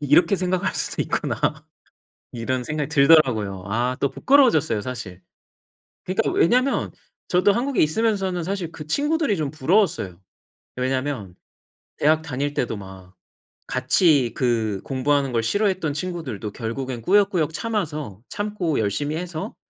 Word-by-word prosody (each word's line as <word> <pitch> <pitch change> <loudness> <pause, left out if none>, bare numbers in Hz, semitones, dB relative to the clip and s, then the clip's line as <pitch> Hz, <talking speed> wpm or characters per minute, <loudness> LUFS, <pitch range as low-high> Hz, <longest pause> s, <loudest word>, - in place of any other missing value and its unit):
...이렇게 160 +6 +4
생각할 180 0 -1
수도 - - -1
있구나." - - -2 1.0
이런 125 +1 -2
생각이 150 -1 -2
들더라고요. 130 - +4
아 120 +4 0
또 140 - +1
부끄러워졌어요 250 - +3
사실. 105 -7 -7 0.8
그니까 185 +1 0
왜냐면 255 +9 +2 0.4
저도 185 +3 +4
한국에 250 +3 +1
있으면서는 190 +1 0
사실 185 -2 -3
그 150 - -9
친구들이 290 - +1
좀 150 -4 -2
부러웠어요. 155 - +1 0.6
왜냐면 130 -6 -2 0.6
대학 155 +1 +3
다닐 145 -1 -3
때도 115 -5 -1
막 95 -2 -11 0.5
같이 130 - +3
그 110 -6 0
공부하는 135 +1 0
걸 115 -2 0
싫어했던 185 - 0
친구들도 145 - -4
결국엔 120 +3 -4
꾸역꾸역 180 - +2
참아서 155 - -3
참고 205 -7 -2
열심히 110 +9 -1
해서 170 -2 -5
150 Hz, 315 characters per minute, -23 LUFS, 120-185 Hz, 1.0 s, 이렇게